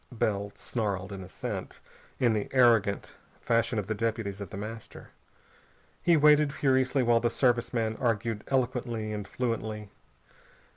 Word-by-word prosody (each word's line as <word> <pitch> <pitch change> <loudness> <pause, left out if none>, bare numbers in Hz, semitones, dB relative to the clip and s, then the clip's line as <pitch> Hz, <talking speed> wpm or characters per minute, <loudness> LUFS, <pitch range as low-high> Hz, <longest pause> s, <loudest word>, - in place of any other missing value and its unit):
Bell 100 -4 -1
snarled 100 -4 -3
an 95 -1 -6
assent, 90 - -6 0.4
in 120 -3 +3
the 105 -1 -2
arrogant 115 -6 +3 0.3
fashion 115 0 +1
of 105 - -1
the 110 - -2
deputies 110 -2 -2
of 100 - -6
The - - -7
Master. 110 +2 -8 0.9
He 170 -2 +4
waited 150 -1 +5
furiously 130 -1 +2
while 120 -1 +4
the 120 - +1
Service 120 0 +1
man 110 -2 -1
argued 115 -3 0
eloquently 120 -4 -1
and 105 -2 -5
fluently. 110 -4 -3
115 Hz, 140 wpm, -29 LUFS, 105-125 Hz, 0.9 s, waited